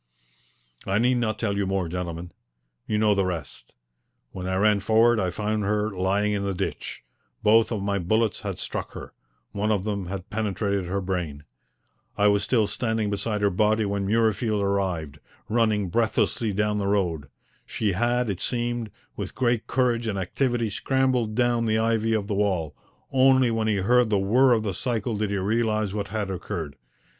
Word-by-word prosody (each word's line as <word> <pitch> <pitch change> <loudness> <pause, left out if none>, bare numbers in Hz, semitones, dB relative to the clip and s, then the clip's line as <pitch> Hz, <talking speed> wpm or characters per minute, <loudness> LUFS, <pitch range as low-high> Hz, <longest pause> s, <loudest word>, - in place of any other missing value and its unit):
I 95 - +1
need 125 +3 +3
not 110 -2 -1
tell 100 -3 -1
you 100 -1 0
more, 95 -2 0
gentlemen. 85 0 -5 0.6
You 105 - 0
know 105 -1 +4
the 100 -1 +1
rest. 80 -9 -5 0.6
When 90 -1 -6
I 95 - -1
ran 105 +1 +3
forward 110 +3 +4
I 95 - 0
found 105 +2 -2
her 105 +1 0
lying 100 +2 0
in 100 -1 -1
the 100 -1 -2
ditch. - - -4 0.4
Both 110 +2 +5
of 105 -4 -2
my 100 0 0
bullets 110 +5 +1
had - - -5
struck - - -4
her. - - -9 0.4
One 105 +2 -1
of 100 -3 +1
them 100 -3 -3
had 95 0 -6
penetrated 100 -3 -1
her 100 +2 -1
brain. 90 -6 -3 0.7
I 105 0 +5
was 100 0 +3
still 110 +1 +2
standing 110 0 -1
beside 105 +1 -2
her 100 -1 +3
body 105 +3 +2
when 100 -1 -2
Murreyfield 110 0 +1
arrived, 95 -7 -1 0.3
running 110 -4 +1
breathlessly 110 +1 +1
down 105 +1 0
the 100 - -1
road. 90 -8 0 0.4
She 105 -2 -1
had, 120 +5 +1
it 95 -4 -3
seemed, 120 -1 -2 0.3
with - - -6
great 120 -3 0
courage 120 -2 +1
and 105 -3 -1
activity 115 +4 -1
scrambled 130 -2 0
down 120 -1 +2
the 110 0 +2
ivy 115 0 +1
of 105 -2 0
the 105 - -3
wall; 95 -7 0 0.4
only 130 -2 +4
when 110 -1 0
he 110 - +2
heard 120 +4 +3
the 105 - +2
whirr 120 +7 +4
of 110 -2 +1
the 100 -3 -2
cycle 115 +1 -2
did 105 0 -1
he 100 - -1
realize 110 0 0
what 100 -1 -3
had 105 -2 -3
occurred. 85 -5 -5
105 Hz, 180 wpm, -25 LUFS, 95-115 Hz, 0.7 s, Both